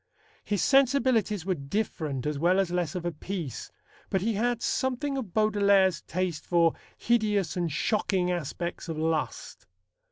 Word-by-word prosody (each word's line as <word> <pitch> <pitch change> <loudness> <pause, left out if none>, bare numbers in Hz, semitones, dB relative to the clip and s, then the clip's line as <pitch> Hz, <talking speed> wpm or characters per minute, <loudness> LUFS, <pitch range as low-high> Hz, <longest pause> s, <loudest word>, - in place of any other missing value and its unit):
His 205 -3 -1
sensibilities 255 - +3
were 190 - +1
different 150 - -3
as 150 -1 -2
well 180 +4 +3
as 190 -3 0
less 175 -3 -1
of 175 -1 -4
a 175 - 0
piece, 165 - -6 0.4
but 190 - 0
he 225 +3 0
had 235 +3 0
something 260 +2 -1
of 245 -9 -4
Baudelaire's 200 -4 +3
taste 180 -2 -3
for 170 -2 +3 0.2
hideous 210 -7 +1
and 175 -3 -1
shocking 185 +1 0
aspects 175 +1 -4
of 160 - -3
lust. 160 -1 -2
185 Hz, 150 wpm, -28 LUFS, 165-215 Hz, 0.4 s, sensibilities